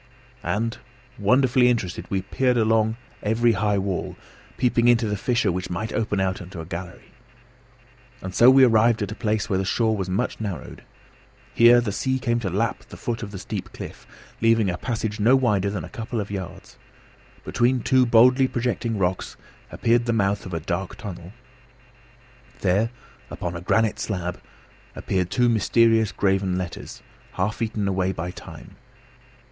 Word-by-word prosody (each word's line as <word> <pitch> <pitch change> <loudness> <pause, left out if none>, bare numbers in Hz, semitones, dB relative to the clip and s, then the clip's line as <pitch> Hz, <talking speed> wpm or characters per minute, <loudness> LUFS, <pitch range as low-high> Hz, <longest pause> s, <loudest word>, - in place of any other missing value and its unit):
And, 115 +2 -2 0.4
wonderfully 125 +3 +4
interested, 100 -7 -2
we 95 -2 -1
peered 125 +4 +1
all 115 - +3
along 110 0 +2 0.2
the 115 +3 +2
high 105 -2 +1
wall, 95 -2 -3 0.4
peeping 120 -1 +2
into 120 -1 +4
every 105 -1 -1
fissure 115 -1 +1
which 90 +1 -4
might 100 +5 -4
open 105 -3 -1
out 95 +1 -1
into 90 -1 -9
a 80 - -6
gallery. 90 +2 -8 1.1
And 95 -4 -7
so 120 +6 +7
we 135 0 +7
arrived 115 -2 +4
at 105 - -4
a - - -3
place 110 -2 -1
where 95 - 0
the - - 0
shore 110 +3 +1
was 95 -3 -3
much 95 +4 -2
narrowed. 100 -5 -6 0.7
Here 120 +1 +7
the 115 -4 -2
sea 130 +6 -1
came 120 -2 0
to 105 -5 -3
lap 105 +6 -2
the - - -10
foot 120 -1 -3
of 105 - -5
the 100 - -8
steep - - -6
cliff, - - -9 0.3
leaving 115 -3 +3
a 90 - -4
passage 110 -2 -3
no 115 +6 +5
wider 105 -7 +2
than 100 - -4
a - - -7
couple 115 +1 -5
of 100 -1 -4
yards. 95 -4 -7 0.6
Between 125 +1 +1
two 130 +1 +3
boldly 125 +3 +5
projecting 120 -2 -2
rocks 90 -1 -2 0.3
appeared 120 +1 +1
the 115 - +2
mouth 100 -2 0
of 90 - -8
a - - -1
dark 85 +4 -4
tunnel. 90 -5 -8 1.3
There, 100 +4 +2 0.4
upon 85 -1 -5
a 85 - -5
granite 110 +4 +1
slab, 90 -4 -3 0.5
appeared 90 -2 -1
two 125 +4 +2
mysterious 115 0 +3
graven 95 -2 0
letters, 90 -2 -6 0.3
half 100 +6 -2
eaten 110 -3 -1
away 95 -1 0
by 85 0 -5
time. - - -12
110 Hz, 170 wpm, -24 LUFS, 95-115 Hz, 1.3 s, so